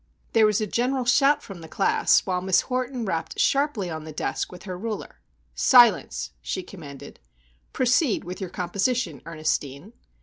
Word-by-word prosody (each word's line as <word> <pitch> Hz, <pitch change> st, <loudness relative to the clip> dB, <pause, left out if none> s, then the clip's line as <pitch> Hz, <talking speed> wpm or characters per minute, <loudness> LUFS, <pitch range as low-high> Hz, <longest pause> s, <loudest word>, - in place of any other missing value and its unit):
There 220 Hz, -1 st, +5 dB
was 210 Hz, -1 st, +1 dB
a 215 Hz, -, 0 dB
general 250 Hz, +5 st, -1 dB
shout 275 Hz, +4 st, +3 dB
from 190 Hz, -4 st, -10 dB
the 160 Hz, -, -10 dB
class, 195 Hz, -, +3 dB
while 180 Hz, -1 st, -1 dB
Miss 185 Hz, 0 st, +3 dB
Horton 255 Hz, -1 st, -3 dB
rapped 165 Hz, -4 st, -3 dB
sharply 275 Hz, -9 st, +1 dB
on 160 Hz, -2 st, -5 dB
the 155 Hz, -, -8 dB
desk 155 Hz, -, -3 dB
with 180 Hz, -, -11 dB
her 185 Hz, -2 st, -6 dB
ruler:— 215 Hz, +3 st, -6 dB, 0.3 s
"Silence!" 165 Hz, -, +4 dB
she 185 Hz, -, -4 dB
commanded. 145 Hz, -9 st, -11 dB, 0.5 s
"Proceed 250 Hz, 0 st, +1 dB
with 180 Hz, +2 st, -7 dB
your 185 Hz, -, -4 dB
composition, 180 Hz, -, -2 dB
Ernestine." 155 Hz, -, -3 dB
195 Hz, 160 wpm, -25 LUFS, 165-245 Hz, 0.5 s, There